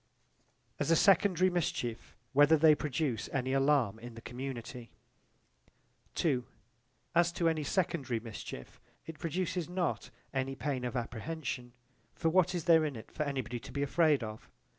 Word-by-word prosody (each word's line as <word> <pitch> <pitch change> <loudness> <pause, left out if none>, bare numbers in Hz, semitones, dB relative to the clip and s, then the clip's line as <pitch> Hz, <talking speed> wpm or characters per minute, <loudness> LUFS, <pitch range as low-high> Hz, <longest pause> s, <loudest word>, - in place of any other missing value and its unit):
As - - 0
a 165 - +6
secondary 185 0 +4
mischief 120 - -2 0.2
whether 145 +3 +6
they 155 0 +7
produce 140 -6 -2
any 130 0 -1
alarm 135 -6 +2
in 120 0 -9
the 115 - -9
community 125 -1 -6 2.2
As 170 0 +4
to 170 -2 +1
any 160 -2 +1
secondary 145 - 0
mischief, 110 -2 -9 0.2
it 160 -2 -9
produces 175 +1 -2
not 180 -2 -2 0.2
any 135 0 -1
pain 130 -2 -2
of 125 - -3
apprehension. 125 +1 -4 0.4
For 165 - +1
what 185 +1 +3
is 170 - -2
there 165 -2 +6
in 150 -3 -2
it 110 - -10
for - - -5
any 140 -3 0
body 120 +1 -5
to 130 - -11
be 140 +2 -1
afraid 150 -2 +3
of? 110 0 -8
145 Hz, 150 wpm, -32 LUFS, 125-165 Hz, 2.2 s, they